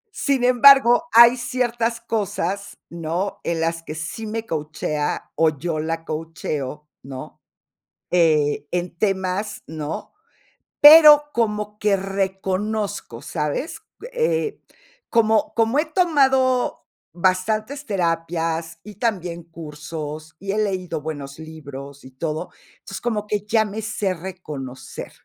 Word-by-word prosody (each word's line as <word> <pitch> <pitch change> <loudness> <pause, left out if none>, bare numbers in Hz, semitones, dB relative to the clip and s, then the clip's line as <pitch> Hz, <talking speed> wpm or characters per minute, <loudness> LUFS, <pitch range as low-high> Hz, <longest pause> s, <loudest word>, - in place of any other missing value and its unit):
Sin 275 -3 0
embargo, 255 +3 +6
hay 235 +2 +8
ciertas 240 -1 -1
cosas, 200 -3 -3
¿no? 170 +4 -3
En 170 -1 -1
las 165 0 -1
que 155 -1 -8
sí 160 +8 -5
me 225 +1 -4
coachea 150 -2 -3
o 160 -1 +3
yo 160 +1 -2
la 165 +1 -3
coacheo, 155 -3 -5
¿no? 130 -1 -9 0.7
Eh, 150 -4 +2
en 175 -1 -3
temas, 195 +2 -1
¿no? 155 0 -6 0.7
Pero 300 0 +10
como 210 -2 -1
que 210 -2 +3
reconozco, 195 - -3
¿sabes? 220 - -3 0.3
Eh, 470 -3 0 0.5
como 220 -2 +2
como 230 +4 +2
he 310 - +1
tomado 265 -7 +2 0.3
bastantes 215 +10 0
terapias 165 -3 -1
y 210 0 -11
también 180 -7 -2
cursos, 155 -1 -8
y 195 +3 -4
he 210 - -1
leído 185 -6 -2
buenos 145 -2 -6
libros 140 -3 -10
y 130 - -13
todo, 160 +5 -4 0.3
entonces, 195 - -9
como 215 -3 -2
que 210 -1 -2
ya 220 0 +3
me 210 +1 -5
se 210 -3 -1
reconocer. 155 -8 -8
190 Hz, 120 wpm, -22 LUFS, 160-225 Hz, 0.7 s, Pero